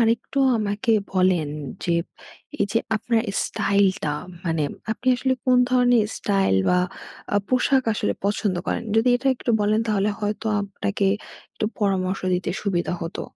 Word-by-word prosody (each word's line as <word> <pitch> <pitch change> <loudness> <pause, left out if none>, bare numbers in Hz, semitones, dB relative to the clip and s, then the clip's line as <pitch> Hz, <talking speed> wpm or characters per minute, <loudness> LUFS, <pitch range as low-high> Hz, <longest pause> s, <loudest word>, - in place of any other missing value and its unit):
আরেকটু 235 +4 +1 0.2
আমাকে 215 +3 0 0.2
বলেন 185 -5 +2 0.4
যে, 170 -2 +1 0.7
এইযে 210 +3 +2 0.2
আপনার 225 +1 0 0.2
স্টাইলটা, 195 -6 +1 0.3
মানে 165 -2 0 0.3
আপনি 255 - -13
আসলে 260 +1 +1
কোন 255 -1 +4
ধরনের 245 -3 +4
স্টাইল 195 - +1
বা, 180 - +4 0.6
আ - - +5
পোশাক 260 +1 +3
আসলে 210 - 0
পছন্দ 200 -2 0
করেন? - - -1
যদি 230 +3 +4
এটা 265 +2 -6
একটু 240 - -2
বলেন, 210 +2 +2
তাহলে 210 0 +1
হয়তো 210 +2 -2 0.2
আপনাকে 200 0 -2 0.5
একটু - - -3 0.2
পরামর্শ 190 -2 0
দিতে 180 - -2
সুবিধা 180 -3 -1
হতো। 165 +2 -5
205 Hz, 140 wpm, -23 LUFS, 185-230 Hz, 0.7 s, আ